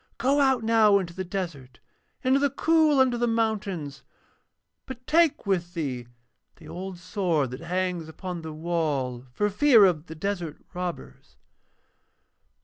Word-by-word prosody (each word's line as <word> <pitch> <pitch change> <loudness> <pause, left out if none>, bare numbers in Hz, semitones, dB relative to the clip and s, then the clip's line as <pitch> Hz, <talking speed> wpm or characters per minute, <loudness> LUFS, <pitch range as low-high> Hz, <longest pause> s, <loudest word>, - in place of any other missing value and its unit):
Go 270 +5 +2
out 265 -4 +3
now 220 -2 +5
into 180 -3 -4
the 190 +1 -4
desert, 165 - -6 0.5
into 260 +2 +3
the 285 0 +2
cool 310 +1 +3
under 250 -2 +3
the 240 - +1
mountains, 205 -10 -2 0.9
but 255 -1 -9
take 330 -4 +3
with 175 -3 -1
thee 130 -7 -3 0.5
the 160 - -15
old 185 +2 -7
sword 175 - -1
that 125 - -6
hangs 180 -1 -2
upon 175 +1 -6
the 160 -1 -7
wall 150 -6 -2
for 205 +12 0
fear 225 +1 +6
of 170 -3 0
the 160 - -8
desert 175 -3 -3 0.2
robbers.' 180 -1 -7
185 Hz, 140 wpm, -26 LUFS, 160-230 Hz, 0.9 s, fear